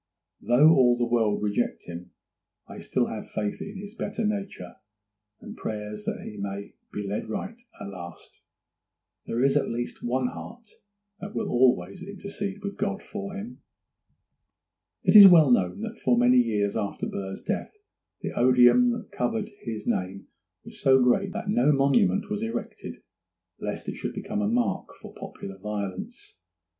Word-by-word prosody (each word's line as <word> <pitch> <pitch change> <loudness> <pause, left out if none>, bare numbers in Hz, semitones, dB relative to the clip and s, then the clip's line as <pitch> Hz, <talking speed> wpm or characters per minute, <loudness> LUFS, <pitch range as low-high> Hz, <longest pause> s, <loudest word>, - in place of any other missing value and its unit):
Though 135 +6 +5
all 125 -5 +5
the 120 - +1
world 115 -4 +1
reject 105 -1 -1
him, 85 +1 -9 0.6
I - - -9
still - - 0
have - - -6
faith 105 -1 -3
in 200 0 -7
this 205 +1 -9
better 225 -1 -3
nature, 200 - -4 0.6
and - - -10
prayers 105 -1 -5
that - - -3
he 105 - -8
may 100 0 -5 0.2
be 105 -1 -4
led 105 +2 -3
right 200 - -5 0.2
at 100 - -6
last. 85 -3 -10 0.9
There 120 +2 0
is 135 0 +3
at 145 - +1
least 120 +1 -4
one 125 +2 0
heart 235 +2 -10 0.5
that 200 +2 -8
will - - -1
always 120 -8 +2
intercede 200 0 -6
with 200 0 -5
God 200 0 -2
for 200 -1 -6
him.' 210 +5 -8 1.4
It - - +3
is 205 -2 +13
well 160 -7 +7
known 90 -6 +2
that - - -6
for 125 -2 +3
many 125 +1 +5
years 105 -4 +1
after 105 -3 -2
Burr's 95 -1 -5
death - - -3 0.5
the - - -3
odium 125 - +5
that 235 -1 -7
covered 220 -2 -2 0.2
his 110 -3 -5
name 95 +2 -2 0.4
was - - -12
so 130 0 +5
great 130 +11 +2
that 225 -1 -5
no 150 -7 +3
monument 150 +10 +3
was 210 0 -3
erected, 225 0 -5 0.6
lest - - -5
it - - -4
should - - -5
become 210 +1 -3
a 205 - +1
mark 245 +1 -1
for - - -11
popular 95 0 -9
violence. 105 - -6
130 Hz, 160 wpm, -26 LUFS, -, 1.4 s, is